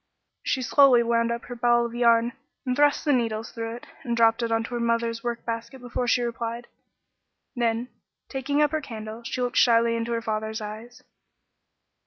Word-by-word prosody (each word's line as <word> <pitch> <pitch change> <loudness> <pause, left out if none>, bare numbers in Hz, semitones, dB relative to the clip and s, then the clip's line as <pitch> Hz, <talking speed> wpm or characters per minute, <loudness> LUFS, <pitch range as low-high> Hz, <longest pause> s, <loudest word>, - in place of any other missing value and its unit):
She 260 - -1
slowly 255 -2 +5
wound 230 0 +1
up 235 0 -3
her - - -7
ball 240 0 +3
of 235 - -6
yarn 235 0 +3 0.3
and 255 -1 0
thrust 290 +2 +3
the 295 - +3
needles 225 -3 -1
through 225 0 -5
it, 240 - -11 0.2
and 235 -3 -2
dropped 225 +1 +4
it 230 - -1
into 225 +1 -1
her 240 - -1
mother's 230 0 0
workbasket 235 +1 -4
before 245 0 -3
she 245 0 +3
replied; 235 0 -4 0.9
then, 235 0 0 0.4
taking 285 +2 0
up 295 - +2
her 310 -1 -1
candle, 220 -3 -7
she 250 +2 -3
looked 245 0 -2
shyly 230 -1 +4
in 230 0 -2
her 235 -1 -1
father's 220 0 -3
eyes. 220 +3 -9
235 Hz, 180 wpm, -25 LUFS, 230-245 Hz, 0.9 s, slowly